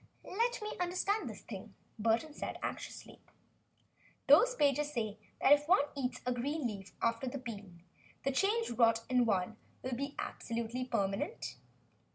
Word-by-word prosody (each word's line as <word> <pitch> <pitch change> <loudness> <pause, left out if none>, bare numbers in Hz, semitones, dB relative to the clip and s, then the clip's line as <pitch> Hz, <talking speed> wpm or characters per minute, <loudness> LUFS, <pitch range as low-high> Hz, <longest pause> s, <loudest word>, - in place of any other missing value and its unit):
"Let 470 +3 0
me 425 - -3
understand 365 - 0
this 215 - -9
thing," 200 -1 -8 0.2
Burton 230 +8 +2
said, - - -4
anxiously. - - -6 1.1
"Those - - +7
pages 290 - +2
say 220 -5 -2 0.2
that 280 - +7
if 290 0 +3
one 350 -4 +6
eats 250 -2 -2
a 250 - +1
green 280 +4 -2
leaf 195 -4 -4
after 230 +3 +1
the 255 - -3
bean, 205 -9 -8 0.4
the 275 - +1
change 410 - +2
wrought 230 -1 +4
in 250 -1 +4
one 200 +1 +1 0.3
will 260 - -3
become 280 +3 -3
absolutely 235 +2 -3
permanent?" 200 - -2
250 Hz, 150 wpm, -34 LUFS, 225-295 Hz, 1.1 s, Those